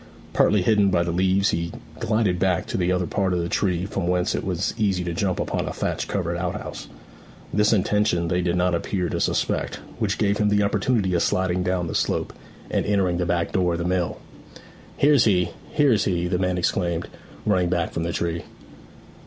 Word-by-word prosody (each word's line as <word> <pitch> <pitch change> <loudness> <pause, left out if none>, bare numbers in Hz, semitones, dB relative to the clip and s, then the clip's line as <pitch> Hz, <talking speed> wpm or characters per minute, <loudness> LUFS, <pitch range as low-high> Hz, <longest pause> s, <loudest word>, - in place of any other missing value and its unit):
Partly 105 -3 +3
hidden 105 -1 +4
by 90 -2 +2
the 85 - -2
leaves 95 +3 +2
he 85 +1 -2 0.3
glided 110 -5 +1
back 90 -1 +1
to - - -5
the 90 -1 +1
other 90 -1 +1
part 95 0 0
of 90 - 0
the 85 - -1
tree, 90 -1 0
from 95 -2 -3
whence 90 0 +1
it - - -2
was 95 0 -1
easy 95 -4 0
to 85 -1 -3
jump 95 +1 -1
upon - - -2
a - - -2
thatch - - -2
covered - - -2
out - - -2
house. - - -8 0.7
This 105 +1 +3
intention 105 -4 +2
they 90 +2 +1
did 85 0 0
not 90 0 +2
appear 90 +1 -1
to - - -2
suspect, - - 0 0.2
which - - 0
gave 100 0 +1
him 105 -1 +3
the 105 0 +3
opportunity 100 -1 +1
of 85 - +2
sliding 90 -1 +1
down 90 -1 0
the 80 - -4
slope - - -1 0.4
and - - +1
entering 95 -4 +1
the 90 -1 -1
back 85 -1 0
door 90 -2 +1
of - - -1
the 85 - -3
mill. 90 -1 0 0.8
'He's 145 -2 +5
here, 90 -5 +3 0.2
he's 130 -8 +3
here!' 90 -2 0
the 90 0 0
men 90 -1 0
exclaimed, 85 -1 0 0.4
running 90 -4 +2
back 85 -2 0
from 80 - -3
the 85 +1 -1
tree. 85 0 -2
90 Hz, 205 wpm, -24 LUFS, 85-100 Hz, 0.8 s, He's